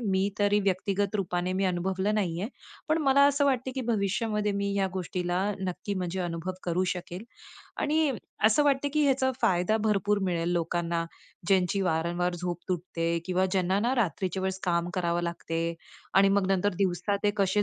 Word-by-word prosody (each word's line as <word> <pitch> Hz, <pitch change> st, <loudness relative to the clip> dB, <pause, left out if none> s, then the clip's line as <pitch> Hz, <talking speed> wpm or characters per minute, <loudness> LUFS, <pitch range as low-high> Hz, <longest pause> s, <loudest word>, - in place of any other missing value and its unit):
मी 195 Hz, -3 st, +1 dB
तरी 205 Hz, 0 st, +3 dB
व्यक्तिगत 200 Hz, +1 st, 0 dB
रूपाने 180 Hz, -2 st, -1 dB
मी 190 Hz, +1 st, 0 dB
अनुभवलं 190 Hz, +3 st, 0 dB
नाही 175 Hz, -5 st, -1 dB
आहे. 205 Hz, -, -2 dB, 0.4 s
पण 310 Hz, +1 st, +3 dB
मला 275 Hz, 0 st, +5 dB
असं 285 Hz, 0 st, +2 dB
वाटते 260 Hz, -2 st, +1 dB
की 265 Hz, -, -2 dB
भविष्यामध्ये 210 Hz, 0 st, 0 dB
मी 200 Hz, 0 st, -1 dB
ह्या 195 Hz, -1 st, +2 dB
गोष्टीला 185 Hz, -1 st, -3 dB, 0.4 s
नक्की 190 Hz, +2 st, -3 dB
म्हणजे 185 Hz, 0 st, -3 dB
अनुभव 175 Hz, +1 st, -3 dB
करू 180 Hz, +1 st, +1 dB
शकेल. 180 Hz, +2 st, -7 dB, 0.6 s
आणि 305 Hz, 0 st, +2 dB, 0.4 s
असं 225 Hz, +7 st, +4 dB
वाटतं 285 Hz, 0 st, +2 dB
की 305 Hz, -, +3 dB
ह्याचा 265 Hz, -1 st, +2 dB
फायदा 180 Hz, +4 st, +3 dB
भरपूर 205 Hz, -1 st, +2 dB
मिळेल 175 Hz, -3 st, 0 dB
लोकांना, 170 Hz, 0 st, -1 dB, 0.4 s
ज्यांची 190 Hz, 0 st, +2 dB
वारंवार 175 Hz, +1 st, 0 dB
झोप 175 Hz, 0 st, -4 dB
तुटते 170 Hz, -1 st, -1 dB
किंवा 185 Hz, 0 st, +2 dB
ज्यांना 185 Hz, 0 st, +2 dB
ना, 240 Hz, +4 st, +1 dB
रात्रीच्या 190 Hz, -4 st, -1 dB
वेळेस 190 Hz, 0 st, -1 dB
काम 170 Hz, -1 st, +1 dB
करावं 175 Hz, -1 st, 0 dB
लागते 170 Hz, -1 st, -2 dB, 0.4 s
आणि 195 Hz, 0 st, +6 dB
मग 200 Hz, -1 st, +2 dB
नंतर 195 Hz, +1 st, +1 dB
दिवसा 190 Hz, +1 st, +1 dB
ते 205 Hz, -, +5 dB
कसे 200 Hz, +1 st, +2 dB
190 Hz, 165 wpm, -28 LUFS, 175-205 Hz, 0.6 s, आणि